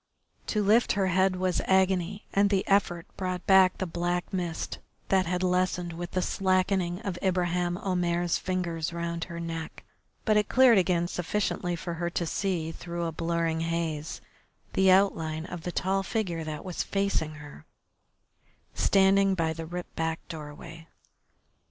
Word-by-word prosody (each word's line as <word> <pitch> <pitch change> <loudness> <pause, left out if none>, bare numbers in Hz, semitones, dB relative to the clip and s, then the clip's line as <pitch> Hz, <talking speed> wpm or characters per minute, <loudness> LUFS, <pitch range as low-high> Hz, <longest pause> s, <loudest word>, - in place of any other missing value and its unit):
To 210 -1 0
lift 220 +4 +4
her 195 -2 +1
head 190 +1 +3
was 185 -1 0
agony, 190 +1 +1
and 200 0 +4
the 195 -2 +1
effort 175 -4 +2
brought 185 -1 -3
back 190 -1 +6
the 190 - -2
black 175 +1 -2
mist 175 -3 -3 0.3
that 190 -2 +3
had 180 +1 -1
lessened 180 -1 0
with 175 +1 -5
the 185 - +1
slackening 185 -2 +1
of 190 -5 -4
Ibraheim 175 -1 0
Omair's 175 -2 0
fingers 175 -3 -2
round 170 0 -3
her 170 -1 -7
neck, 165 -1 -6 0.4
but 215 -2 +4
it 210 - +1
cleared 250 -5 +6
again 175 -2 +1
sufficiently 180 0 -1
for 170 +1 -5
her 170 +1 -2
to 170 0 -2
see, 170 -2 -1
through 170 +1 -5
a 165 - -2
blurring 165 0 -1
haze, 165 -2 -2 0.5
the 190 0 +4
outline 165 -5 +2
of 175 -1 -7
the 175 - -4
tall 190 +2 0
figure 185 -5 -2
that 155 +1 -5
was 180 -2 -3
facing 195 -6 -1
her, 145 - -12 1.1
standing 195 0 +4
by 165 -2 0
the 165 0 -7
ripped 175 +1 -7
back 160 0 -2
doorway. 160 +1 -9
175 Hz, 155 wpm, -28 LUFS, 165-190 Hz, 1.1 s, back